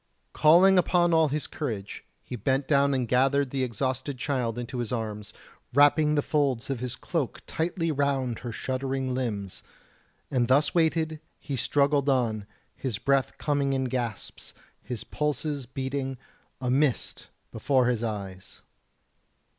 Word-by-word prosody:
Calling 180 +5 +6
upon 175 -1 +3
all 160 -1 +5
his 150 +1 -2
courage, 110 -10 -5 0.2
he - - -6
bent 130 +5 0
down 140 -1 +3
and 125 -2 -1
gathered 135 +2 +2
the 135 -1 0
exhausted 130 +3 -2
child 125 -4 -1
into 120 +1 -4
his 120 0 -3
arms, 110 -3 -4 0.4
wrapping 150 +1 +5
the 145 - +2
folds 140 -5 0
of 135 - -2
his 125 0 -3
cloak 155 -5 -3
tightly 165 0 -1
round 135 -4 0
her 120 - -5
shuddering 130 +2 -2
limbs; 105 -7 -3 0.7
and 125 -3 +2
thus 140 +4 +3
weighted 160 -2 +1 0.2
he 140 - -5
struggled 140 +2 +2
on, 115 -6 0 0.3
his 125 -6 -3
breath 135 +3 +1
coming 140 -2 0
in 135 0 0
gasps, 120 -4 -4 0.3
his 120 -4 -6
pulses 150 -2 -2
beating, 135 +1 -3 0.4
a 125 -1 -1
mist 135 -1 0 0.2
before 130 +3 +2
his 120 -2 0
eyes. 100 -4 -6
135 Hz, 140 wpm, -27 LUFS, 120-145 Hz, 0.7 s, Calling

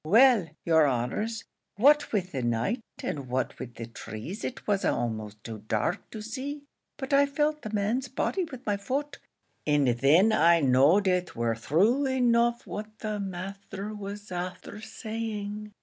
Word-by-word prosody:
Well, 225 +2 +6 0.2
yer 160 -3 +5
honours 140 - -1 0.3
what 290 +7 +5
with 185 -4 -1
the 135 - -2
night, 120 - 0 0.2
and 140 -4 -4
what 130 0 -2
wid 120 -2 -7
the 115 - -6
trees 115 - -7
it 255 - -5
was 200 -2 +1
a'most 110 -3 -2
too 110 -2 -7
dark 110 - -1
to 215 -2 -7
see; 280 +6 -5 0.3
but 265 0 -4
I 280 0 +6
felt 300 +2 0
the 215 - -6
man's 215 +5 0
body 280 +9 -1
with 260 -5 -10
my 205 -1 +1
foot, 280 +8 -3 0.5
and 145 -3 +3
then 145 - +5
I 170 -4 +5
know'd 145 +8 +4
it 180 -1 0
war 115 -1 0
thrue 205 - +2
enough 240 -2 +2
what 215 +1 -7
the 215 -1 -2
masther 195 +2 -6
was 205 -1 -7
afther 180 +3 -5
saying. 215 -2 -5
205 Hz, 160 wpm, -28 LUFS, 145-235 Hz, 0.5 s, Well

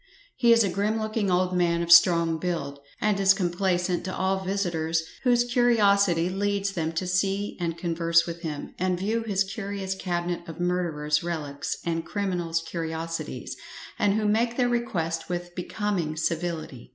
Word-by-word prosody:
He 240 -2 +4
is 230 -1 +6
a 200 - +1
grim 205 +4 0
looking 215 -2 -1
old 180 0 +1
man 170 -1 +2
of 170 - -2
strong 170 -1 +6
build; 165 -6 -3 0.2
and 210 -2 +1
is 195 0 +5
complacent 180 -1 0
to 185 - -4
all 190 0 0
visitors 170 -4 -1 0.2
whose 245 -2 +4
curiosity 200 -8 +3
leads 200 +1 -1
them 165 -4 -2
to 165 +3 -2
see 195 +2 0
and 170 -1 -2
converse 170 0 +2
with 170 0 -6
him, 155 -4 -5
and 185 0 +1
view 215 +5 -1
his 200 -3 +1
curious 195 -1 -4
cabinet 175 -2 -2
of 165 +1 -8
murderers' 165 -4 0
relics 150 -5 -4
and 165 -1 -1
criminals' 175 -4 -2
curiosities; 165 0 -4 0.4
and 205 -1 +3
who 215 -1 +1
make 230 +3 +1
their 245 -2 +2
request 170 -10 -2
with 175 0 -4
becoming 180 -3 -2
civility. 160 -6 -3
180 Hz, 160 wpm, -26 LUFS, 165-200 Hz, 0.4 s, is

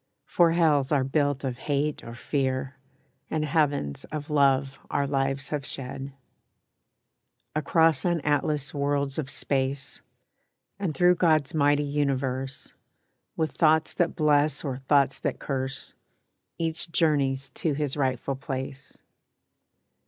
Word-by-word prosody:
For 170 -2 +3
hells 150 -5 +3
are 140 -3 +3
built 145 0 0
of 130 -2 -3
hate 145 +1 0
or 115 - -8
fear, 130 +1 -2 0.5
And 155 -1 -1
heavens 145 - 0
of 150 0 -6
love 135 -2 +2
our 140 - 0
lives 135 0 -1
have 150 -2 -2
shed. 135 +1 -5 1.4
Across 160 0 +3
unatlassed 150 -3 0
worlds 140 0 0
of 140 -3 -3
space, 135 0 -1 0.8
And 180 -7 -2
through 180 +4 +5
God's 155 -5 +2
mighty 145 -1 +3
universe, 135 -2 -2 0.6
With 160 -3 0
thoughts 160 +1 +3
that 175 -1 0
bless 150 -1 +2
or 135 -4 -3
thoughts 140 0 +2
that - - -2
curse, 135 -1 -4 0.6
Each 165 0 -2
journeys 140 -5 +1
to 155 +3 -1
his 145 -1 -2
rightful 135 -1 -1
place. 135 0 -6
140 Hz, 120 wpm, -26 LUFS, 135-155 Hz, 1.4 s, through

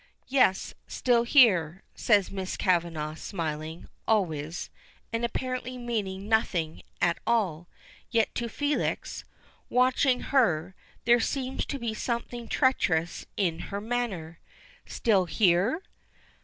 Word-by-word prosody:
"Yes, 255 -8 +3
still 240 -2 +2
here," 190 - +5
says 205 -4 +2
Miss 190 -1 -4
Kavanagh, 165 -4 0
smiling, 160 -3 -5 0.2
always, 165 -7 0 0.4
and 230 +1 -1
apparently 255 +1 -3
meaning 205 -5 -3
nothing 180 -8 0 0.2
at 170 -1 +2
all; 185 -8 +1 0.4
yet 230 -2 +1
to 235 -1 -3
Felix, 290 +5 -2 0.5
watching 255 +1 +3
her, 185 - +3 0.3
there 240 +1 +6
seems 260 +3 -2
to 280 - -3
be 235 -4 -3
something 235 +1 -3
treacherous 175 - +1
in 170 -5 0
her 200 - -3
manner. 205 -8 -3 0.5
"Still 200 -6 +2
here?" 190 - +2
210 Hz, 110 wpm, -28 LUFS, 170-240 Hz, 0.5 s, there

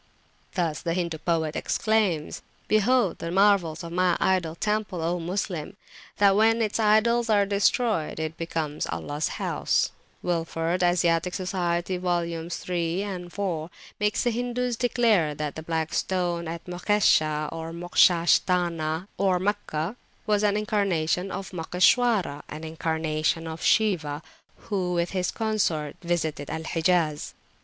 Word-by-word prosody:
Thus 165 -5 -1
the 165 -1 -1
Hindu 170 -3 -2
poet 160 -1 -1
exclaims: 205 -8 0 0.3
Behold 215 -1 +2
the 165 - -4
marvels 185 -4 +3
of 170 - -7
my 180 0 +2
idol 175 -4 +1
temple, 210 -1 -1
O 175 +2 0
Moslem! 180 0 -3 0.4
That 200 -1 +5
when 225 +2 +4
its 220 -1 0
idols 225 +2 +3
are 205 -2 +4
destroyd, 200 -3 +1
it 160 0 -3
becomes 160 -3 -3
Allahs 115 - -3
House. - - 0 0.3
Wilford 165 0 -1
(As. 175 -1 +3
Soc. 165 -1 +3
vols. 175 -2 -2
iii. 175 +1 -1
and 185 -3 -5
iv.) 175 -3 -3 0.3
makes 210 0 +1
the 240 - +2
Hindus 245 +1 -1
declare 225 -10 +2
that 150 -1 -3
the 160 - -5
Black 160 -1 -2
Stone 175 -2 -1
at 165 +1 -6
Mokshesha, 175 -5 +2
or 165 0 -6
Moksha 170 0 +3
sthana 170 -2 +1
(Meccah) 190 -2 0 0.3
was 210 -2 +2
an 205 -1 +2
incarnation 195 -4 0
of 195 - -6
Moksheshwara, 180 - +2
an 155 +1 -7
incarnation 160 0 -1
of 160 0 -6
Shiwa, 160 -9 +1 0.3
who 185 -4 -2
with 170 0 0
his 185 -2 -1
consort 190 -10 -1
visited 160 -5 -2
Al 160 0 -4
Hijaz. 160 -2 0
175 Hz, 130 wpm, -26 LUFS, 160-200 Hz, 0.4 s, That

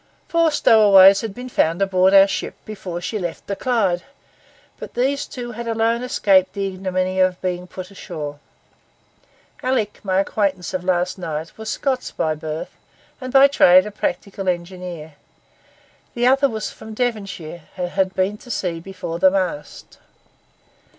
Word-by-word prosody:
Four 335 -1 +3
stowaways 200 -8 +6
had 220 -3 -5
been 250 +1 -7
found 165 -8 +1
aboard 190 -1 +3
our 195 0 +8
ship 195 - -4
before 185 -5 -6
she 210 +5 -3
left 175 -3 -5
the 200 - -3
Clyde, 200 -8 0 0.8
but - - -9
these 275 +4 0
two 240 -2 -7
had 235 +1 -7
alone 230 +1 +1
escaped 195 -6 +2
the 200 -1 -2
ignominy 185 -1 -2
of 185 -1 +2
being 180 -1 -3
put 185 +1 -9
ashore. 150 -6 -7 1.2
Alick, 250 -5 -1
my 190 -1 +1
acquaintance 195 -3 -1
of 185 -1 -2
last 180 0 0
night, 160 -2 -5
was 220 0 -7
Scots 265 -2 -1
by 155 - -1
birth, 155 0 -6 0.5
and 255 0 -5
by 270 +1 +7
trade 185 -9 +6
a 210 - -6
practical 195 0 -3
engineer; 175 -3 -5 1.0
the 240 0 +1
other 270 +2 +4
was 220 -2 -4
from 220 0 -11
Devonshire, 195 -9 -4
and 180 -1 -2
had 190 0 -1
been 195 +3 0
to 245 - -15
sea 180 -7 -2
before 175 -2 -6
the 190 - +6
mast. 185 -6 -4
190 Hz, 155 wpm, -21 LUFS, 180-220 Hz, 1.2 s, our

